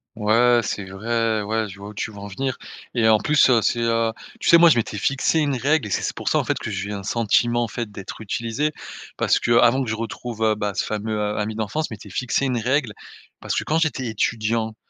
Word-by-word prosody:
Ouais, 115 Hz, +3 st, +4 dB
c'est 100 Hz, -1 st, -3 dB
vrai, 110 Hz, +2 st, -1 dB
ouais, 110 Hz, +1 st, -1 dB
je 95 Hz, -, -11 dB
vois 100 Hz, +1 st, -8 dB
où 105 Hz, -, -10 dB
tu 105 Hz, -, -4 dB
veux 105 Hz, -, -13 dB
en 100 Hz, 0 st, -7 dB
venir 130 Hz, +6 st, -3 dB, 0.4 s
et 115 Hz, -2 st, +3 dB
en 110 Hz, -1 st, +5 dB
plus, 150 Hz, +3 st, +4 dB
heu, 115 Hz, -2 st, +4 dB
c'est, 120 Hz, -, +1 dB
heu, 115 Hz, -1 st, +1 dB, 0.3 s
tu -, -, 0 dB
sais, 170 Hz, -, +9 dB
moi, 170 Hz, 0 st, +7 dB
je -, -, +4 dB
m'étais 110 Hz, -2 st, -1 dB
fixé 135 Hz, +8 st, +1 dB
une 145 Hz, -3 st, +1 dB
règle 140 Hz, -1 st, +1 dB
et -, -, -8 dB
c'est -, -, 0 dB
c'est -, -, -3 dB
pour -, -, -2 dB
ça, -, -, +2 dB
en -, -, 0 dB
fait, -, -, -1 dB
que 115 Hz, -, -5 dB
je 95 Hz, 0 st, -3 dB
vis 105 Hz, -, -4 dB
un 100 Hz, -, -5 dB
sentiment, 120 Hz, +3 st, +1 dB
en -, -, -2 dB
fait, 115 Hz, 0 st, -5 dB
d'être 100 Hz, -1 st, -8 dB
utilisé, 115 Hz, +7 st, -2 dB, 0.5 s
parce -, -, +2 dB
qu'avant 120 Hz, +3 st, +4 dB
que 120 Hz, -, -5 dB
je 110 Hz, -, -1 dB
retrouve, 115 Hz, 0 st, -6 dB
heu, 110 Hz, -1 st, +3 dB
bah, 105 Hz, -1 st, -2 dB
ce -, -, -1 dB
fameux, 110 Hz, +1 st, -3 dB
heu, 105 Hz, 0 st, -1 dB
ami 105 Hz, +1 st, -2 dB
d'enfance, 110 Hz, +9 st, -2 dB
je -, -, -7 dB
m'étais 105 Hz, 0 st, -10 dB
fixé 125 Hz, +7 st, -1 dB
une 130 Hz, -2 st, 0 dB
règle 125 Hz, 0 st, 0 dB, 0.5 s
parce -, -, -3 dB
que -, -, 0 dB
quand 155 Hz, -, 0 dB
j'étais 155 Hz, -6 st, 0 dB
étudiant, 110 Hz, 0 st, -1 dB
115 Hz, 255 wpm, -22 LUFS, 105-120 Hz, 0.5 s, sais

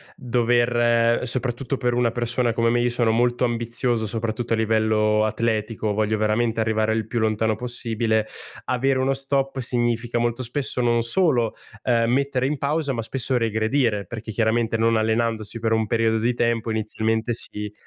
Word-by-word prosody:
dover 120 Hz, -1 st, +2 dB
soprattutto 130 Hz, +2 st, -2 dB
per 120 Hz, -1 st, 0 dB
una 120 Hz, -1 st, +1 dB
persona 120 Hz, 0 st, -1 dB
come 115 Hz, 0 st, +1 dB
me, 120 Hz, +1 st, +2 dB
io 120 Hz, -, +2 dB
sono 120 Hz, -1 st, +1 dB
molto 120 Hz, +2 st, +1 dB
ambizioso 120 Hz, 0 st, 0 dB
soprattutto 115 Hz, +2 st, -2 dB
a -, -, +4 dB
livello 110 Hz, -1 st, +2 dB
atletico 110 Hz, -1 st, -1 dB
voglio 110 Hz, 0 st, 0 dB
veramente 110 Hz, +2 st, +1 dB
arrivare 110 Hz, 0 st, +1 dB
il 110 Hz, -1 st, -2 dB
più 120 Hz, -, -4 dB
lontano 110 Hz, 0 st, +1 dB
possibile, 115 Hz, -2 st, -1 dB, 0.4 s
avere 130 Hz, +1 st, +1 dB
uno 135 Hz, +1 st, +1 dB
stop 135 Hz, 0 st, -1 dB
significa 120 Hz, -1 st, -1 dB
molto 120 Hz, +2 st, -1 dB
spesso 125 Hz, +1 st, -2 dB
non 120 Hz, -1 st, +2 dB
solo, 120 Hz, -2 st, +1 dB, 0.3 s
uhm, 115 Hz, -1 st, +2 dB
mettere 135 Hz, -1 st, +1 dB
in 145 Hz, +2 st, -1 dB
pausa 145 Hz, 0 st, 0 dB
ma 115 Hz, -, -2 dB
spesso 125 Hz, +2 st, -1 dB
regredire, 110 Hz, -1 st, 0 dB
perché 115 Hz, -1 st, -7 dB
chiaramente 115 Hz, +1 st, +1 dB
non 115 Hz, 0 st, +2 dB
allenandosi 110 Hz, 0 st, -1 dB
per 115 Hz, 0 st, -1 dB
un 110 Hz, -1 st, +1 dB
periodo 115 Hz, -1 st, +1 dB
di 120 Hz, +2 st, 0 dB
tempo 115 Hz, -1 st, 0 dB
inizialmente 110 Hz, +1 st, -1 dB
si 105 Hz, -2 st, -4 dB
115 Hz, 160 wpm, -23 LUFS, 110-120 Hz, 0.4 s, a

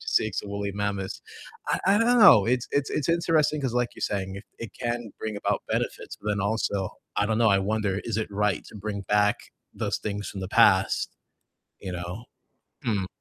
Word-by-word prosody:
to -, -, -8 dB
see 110 Hz, -2 st, +2 dB
some 105 Hz, -, -3 dB
woolly 100 Hz, 0 st, -3 dB
mammoths. 100 Hz, -2 st, -3 dB, 0.5 s
I -, -, +1 dB
I 200 Hz, +2 st, +5 dB
don't 240 Hz, +2 st, +4 dB
know, 185 Hz, -, +9 dB
it's 125 Hz, +1 st, +1 dB
it's 140 Hz, 0 st, +1 dB
it's 150 Hz, -, -1 dB
interesting 160 Hz, -3 st, +2 dB
'cause 130 Hz, -4 st, -2 dB
like 125 Hz, -1 st, +1 dB
you're -, -, -12 dB
saying, 95 Hz, -2 st, -2 dB
it 100 Hz, -, -9 dB
it 115 Hz, -, -6 dB
can 120 Hz, -2 st, -3 dB
bring 110 Hz, -1 st, -3 dB
about 100 Hz, -, -1 dB
benefits, -, -, -3 dB
but 105 Hz, -, -5 dB
then 105 Hz, -1 st, 0 dB
also, 100 Hz, -2 st, -1 dB, 0.3 s
I 105 Hz, -, +2 dB
don't 110 Hz, 0 st, 0 dB
know, 115 Hz, -1 st, +5 dB
I 100 Hz, -2 st, +4 dB
wonder 100 Hz, 0 st, 0 dB
is 115 Hz, -3 st, -2 dB
it 110 Hz, -, -1 dB
right 105 Hz, 0 st, 0 dB
to -, -, -11 dB
bring 100 Hz, 0 st, -4 dB
back 105 Hz, +1 st, +3 dB, 0.4 s
those -, -, -2 dB
things 100 Hz, -1 st, -4 dB
from 95 Hz, -, -6 dB
the 95 Hz, -, -4 dB
past, -, -, +4 dB, 0.7 s
you 95 Hz, -, -5 dB
know? 90 Hz, +5 st, -6 dB, 0.6 s
Hmm. 105 Hz, -5 st, 0 dB
105 Hz, 205 wpm, -26 LUFS, 100-120 Hz, 0.7 s, know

